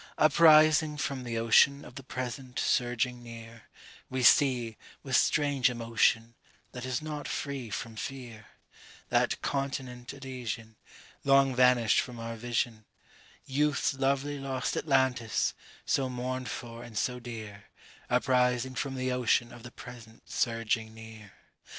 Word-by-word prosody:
Uprising 155 -1 +6
from 140 -3 -3
the 115 -2 -4
ocean 130 +5 +4
of 125 - -12
the 135 - -8
present 130 0 -6
surging 125 0 0
near, 115 -1 -11 0.4
We 130 -1 -2
see, 120 -3 +4 0.3
with - - -1
strange 145 -4 +3
emotion, 115 -1 +1 0.4
that 125 -1 -7
is 130 +3 -2
not 150 -2 -5
free 140 -5 -4
from 115 +2 -5
fear, 120 -4 -7 0.6
That - - +1
continent 130 -3 -3
Elysian 125 -5 -6 0.5
Long 135 -1 +4
vanished 125 -3 +4
from 125 -2 -8
our 115 0 -5
vision, 115 -1 -2 0.6
Youth's 145 +1 +1
lovely 140 +1 -1
lost 135 -1 -2
Atlantis, 130 -6 +1 0.3
so 135 -2 +1
mourned 130 0 -4
for 115 0 -7
and 115 -3 -9
so 125 +3 -1
dear, 110 -4 -9 0.4
Uprising 125 0 +2
from 135 +1 -3
the 130 0 -1
ocean 120 -1 +1
of 120 - -12
the 120 - -9
present 120 -2 -13
surging 115 -1 -1
near. 110 -2 -12
125 Hz, 130 wpm, -29 LUFS, 115-135 Hz, 0.6 s, Uprising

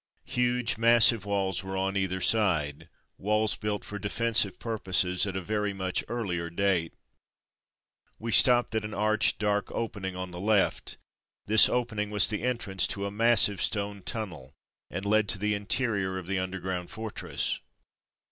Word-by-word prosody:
Huge, 125 -2 -1
massive 115 -2 +6
walls 100 -1 -1
were 95 0 -5
on 95 +1 -2
either 95 -1 -2
side; 85 -11 +1 0.3
walls 105 +1 +1
built 105 -1 -4
for 105 - -7
defensive 105 0 +1
purposes 95 -4 0
at 95 -1 -4
a - - -3
very 105 0 -2
much 95 -1 -2
earlier 90 -8 -4
date. 85 -2 -1 1.2
We 115 +1 -5
stopped 120 +2 +5
before 110 -1 -2
an 105 - -10
arched, 110 +1 +1
dark 105 -1 -1
opening 100 -5 -5
on 90 0 -6
the 90 - -8
left. 105 0 0 0.5
This 110 +1 +6
opening 110 -4 -2
was 105 +1 +4
the 105 - -3
entrance 115 -6 0
to 100 0 -3
a 100 - -4
massive 105 -2 +3
stone 100 -1 -2
tunnel, 80 - -6 0.3
and 100 +3 -6
led 105 0 +1
to - - +2
the 105 +2 -1
interior 100 -2 -1
of 95 - -7
the 95 +1 -2
underground 95 -1 -5
fortress. 110 0 -3
100 Hz, 155 wpm, -27 LUFS, 95-110 Hz, 1.2 s, massive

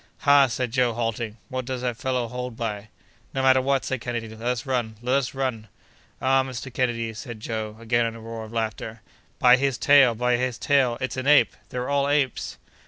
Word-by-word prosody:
"Ha!" 140 -2 +6
said 125 0 -2
Joe, 125 -1 +2
halting, 115 -1 -3
"what 130 -1 -3
does 130 -1 -4
that 125 -2 -1
fellow 125 -1 -1
hold 125 0 -6
by?" 110 -2 -4 0.5
"No 135 - 0
matter 130 0 +5
what!" 135 0 +1
said 130 -2 -2
Kennedy; 120 -1 -3
"let 110 0 -12
us 125 0 -1
run! 120 -5 -1
let 125 +2 -1
us 135 -1 0
run!" 125 -5 -2 0.5
"Ah! 135 0 +3
Mr. 130 -1 -6
Kennedy," 115 -3 -1
said 115 0 -8
Joe, 110 -1 -4
again, 115 0 +1
in 115 - -5
a - - -9
roar 115 0 -7
of 110 - -10
laughter, 110 -1 -4 0.4
"by 125 0 +6
his 135 -2 0
tail! 140 -5 +5
by 125 +1 +1
his 125 -1 -2
tail! 130 -4 +2
it's 130 -1 -3
an 130 +1 -3
ape! 120 - +5
They're 125 0 -4
all 140 0 +1
apes!" 145 -4 0
125 Hz, 205 wpm, -25 LUFS, 115-130 Hz, 0.5 s, Ha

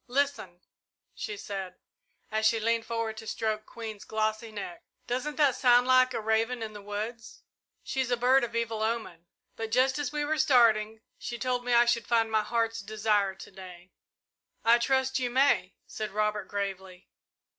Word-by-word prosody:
"Listen," 250 -9 -1 0.5
she 425 -4 -5
said, 195 - -6 0.6
as 220 0 +2
she 225 0 +2
leaned 230 +1 0
forward 230 -1 -2
to 220 - -9
stroke 215 -1 -2
Queen's 220 -3 -8
glossy 220 +1 -2
neck, 345 - -7 0.2
"doesn't 260 +5 -2
that 285 -4 +3
sound 245 -1 +5
like 255 0 +5
a - - 0
raven 225 +2 0
in 215 -1 -6
the 205 - -9
woods? 215 +3 -6 0.4
She's 265 -2 -2
a 245 - +1
bird 255 +2 +4
of 235 -1 -4
evil 230 -2 -1
omen, 220 -7 -3 0.3
but, 225 0 -4
just 260 +3 +3
as 285 -4 -2
we 295 -1 -1
were 310 +1 -1
starting, 225 -7 +4 0.2
she 240 - -5
told 250 0 -1
me 245 0 0
I 240 0 +6
should 235 -2 +1
find 225 -1 +2
my 220 -1 +3
heart's 225 +1 -1
desire 205 -1 0
to 190 - -12
day." 185 -1 -12 0.7
"I 235 +1 +6
trust 265 +1 +1
you 250 -1 -1
may," 240 -8 +2
said 215 -1 -5
Robert, 210 +1 -1
gravely. 190 -2 -5
225 Hz, 175 wpm, -28 LUFS, 215-250 Hz, 0.7 s, I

